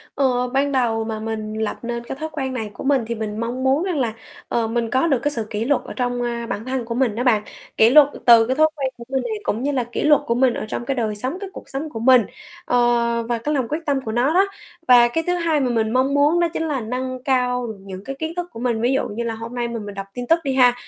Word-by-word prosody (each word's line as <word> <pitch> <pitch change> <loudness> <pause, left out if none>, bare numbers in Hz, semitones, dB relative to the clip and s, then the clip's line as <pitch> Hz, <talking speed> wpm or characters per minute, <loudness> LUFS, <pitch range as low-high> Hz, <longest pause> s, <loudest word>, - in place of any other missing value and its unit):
Ờ, 250 -2 +1
ban 275 +2 0
đầu 230 -4 +1
mà 220 -1 -4
mình 215 -1 -4
lập 215 - -2
nên 235 0 -4
cái 235 - -6
thói 315 - -3
quen 270 -4 -3
này 220 -4 -4
của - - -8
mình 270 -2 +3
thì 235 - -3
mình 215 -1 -4
mong 240 +3 -3
muốn 270 +4 +3
rằng 365 -5 -1
là, 230 -4 0 0.3
ờ, 230 -1 0
mình 230 0 -1
có 260 +7 +2
được 275 -6 +2
cái 290 - +1
sự 225 -6 -3
kỷ 215 +1 -2
luật 285 +2 +1
ở - - -7
trong, 245 -1 -1
ơ, 235 -1 -3
bản 210 - -4
thân 260 -1 -2
của 230 0 -4
mình 245 -3 +1
đó 240 +3 -2
bạn, 220 -5 +3 0.3
kỷ 225 +1 +6
luật 290 +1 +8 0.2
từ 230 -2 +8
cái 260 +2 0
thói 310 +1 +6
quen 275 -3 -1
của 235 - -10
mình 265 0 -1
này, 470 - -3
cũng 230 - -2
như 285 +2 0
là 255 -3 0
kỷ 240 - -4
luật 300 -1 +5
của 235 - +1
mình 250 0 +3
ở - - -4
trong 240 - -4
cái 270 +2 -1
đời 220 -4 -1
sống, 255 - -3
cái 395 -2 -6
cuộc - - -11
sống 280 +3 -5
của 225 - -6
mình, 255 +1 +6 0.4
ờ, 245 - 0 0.5
và 240 -1 0
cái 295 +7 -2
lòng 260 -5 0
quyết 305 - -1
tâm 280 -2 +1
của 220 - -3
nó 250 +7 +2
đó. 385 +2 +5 0.4
Và 240 -1 +7
cái 325 +7 -2
thứ 355 - +1
hai 335 -4 +1
mà 255 -2 +1
mình 225 -1 0
mong 260 +2 +2
muốn 295 +4 +3
đó 345 - +3
chính 320 - -2
là 280 -4 -1
nâng 255 +3 -4
cao 250 -2 +1
những 190 0 -9
cái 275 0 -6
kiến 320 +2 -4
thức 355 0 -3
của 225 - -8
mình, 235 -2 0
ví 240 +3 +2
dụ 270 - 0
như 230 +3 -4
là 230 -1 -2
hôm 230 +2 -7
nay 240 -1 -2
mà 235 0 -4
mình 205 -2 -7
đọc 195 0 -6
tin 245 -1 -5
tức 330 +6 +4
đi 270 -2 -1
ha, 250 -2 +5
250 Hz, 295 wpm, -21 LUFS, 230-275 Hz, 0.5 s, luật